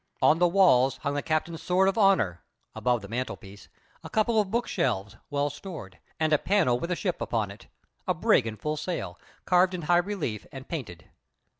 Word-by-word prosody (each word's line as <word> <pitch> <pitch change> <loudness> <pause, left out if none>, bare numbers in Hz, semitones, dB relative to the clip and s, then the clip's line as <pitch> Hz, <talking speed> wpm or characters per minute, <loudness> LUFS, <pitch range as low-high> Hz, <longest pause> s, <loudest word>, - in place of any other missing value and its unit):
On 160 - +4
the 175 - +5
walls 135 -9 +4
hung 140 -1 -1
the 145 - -1
captain's 160 +1 -2
sword 185 +2 +2
of 195 - +1
honour 185 - +3 0.3
(above 125 -3 0
the - - -7
mantelpiece), 110 -3 -6 0.3
a - - -8
couple 220 0 +2
of 200 - -5
bookshelves, 170 - -1
well 145 0 0
stored, 145 - -9 0.2
and 155 -1 +2
a 150 - +4
panel 175 -12 +2
with 170 - -4
a 180 - 0
ship 180 0 -3
upon 110 -4 -1
it 100 - -14 0.4
a - - +1
brig - - +3
in 110 -1 -5
full 150 +8 -3
sail 175 +3 -4 0.3
carved 180 0 +3
in 175 - -5
high 175 +3 +3
relief 175 - -2
and 135 0 -9
painted. 105 - -7
155 Hz, 190 wpm, -27 LUFS, 120-185 Hz, 0.4 s, the